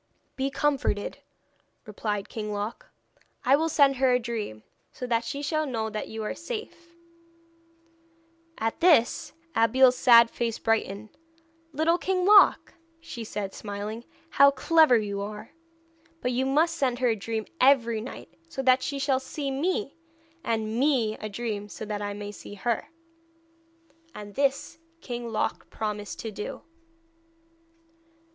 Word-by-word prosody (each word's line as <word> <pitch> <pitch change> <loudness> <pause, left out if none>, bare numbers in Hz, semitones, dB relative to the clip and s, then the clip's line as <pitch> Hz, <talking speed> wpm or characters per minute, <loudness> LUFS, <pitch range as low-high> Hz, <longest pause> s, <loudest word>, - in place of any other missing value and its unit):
'Be 270 +1 -1
comforted,' 275 -7 -1 0.7
replied 210 -1 -3
King 210 -2 -5
Loc; 205 +3 -5 0.6
'I 265 - +6
will 320 +3 0
send 280 -3 +4
her 260 0 +3
a 250 - +4
dream, 225 - -5 0.3
so 250 - -6
that 235 -1 0
she 280 +5 -5
shall 310 0 0
know 220 -4 -2
that 215 - -4
you 220 0 -6
are 210 - -3
safe.' 340 -4 -8 1.6
At 225 0 -2
this 310 -3 +3 0.2
Abeille's 250 +3 +5
sad 235 -2 +6
face 230 -2 -2
brightened. 215 -1 -1 0.6
'Little 320 +4 +1
King 370 0 0
Loc,' 410 +1 +6 0.3
she 330 -8 -8
said, 205 -3 -5
smiling, 210 +2 -6 0.3
'how 280 0 +7
clever 310 -1 +4
you 200 -2 -3
are! 210 +1 -7 0.7
But 250 - -1
you 255 +2 0
must 325 +5 +2
send 255 -5 0
her 250 -1 +2
a 225 - +2
dream 220 +1 -4
every 235 -4 +4
night, 220 -7 -9 0.2
so 270 - -4
that 255 0 +4
she 280 - -3
shall 275 -1 +1
see 275 +1 -4
me 335 +3 -2 0.4
and 220 0 -1
me 255 -6 +2
a 215 - -5
dream, 210 -1 -4
so 215 - -7
that 210 -1 -4
I 205 0 -3
may 205 0 -6
see 205 - -10
her.' 235 +3 -2 1.3
And 205 -1 -9
this 275 +4 -1 0.2
King 240 -5 -5
Loc 215 - -2
promised 210 -1 -4
to 225 - -5
do. 210 0 -7
240 Hz, 145 wpm, -27 LUFS, 215-280 Hz, 1.6 s, how